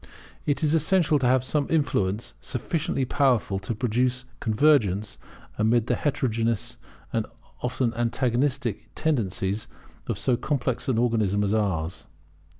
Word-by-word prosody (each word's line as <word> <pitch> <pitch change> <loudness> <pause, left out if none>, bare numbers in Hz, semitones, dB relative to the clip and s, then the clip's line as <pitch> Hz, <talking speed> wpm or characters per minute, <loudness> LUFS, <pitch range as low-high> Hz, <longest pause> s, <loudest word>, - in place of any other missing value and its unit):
It 145 +2 +1
is 155 0 +3
essential 160 -1 +3
to 125 - +2
have 130 0 +3
some 145 +2 0
influence 110 -9 0
sufficiently 135 +1 -1
powerful 125 -8 +2
to 100 +4 -4
produce 125 +2 0
convergence 110 -5 +2 0.4
amid 110 +1 +3
the - - +1
heterogeneous 115 -4 -1 0.4
and 115 -2 0 0.3
often 125 -1 0
antagonistic 120 0 0
tendencies 105 -8 -1 0.4
of - - -2
so 125 -2 +1
complex 130 -2 -1
an 130 -4 +1
organism 110 -4 +2
as 100 +1 +1
ours. 95 -6 -1
120 Hz, 125 wpm, -26 LUFS, 110-135 Hz, 0.4 s, is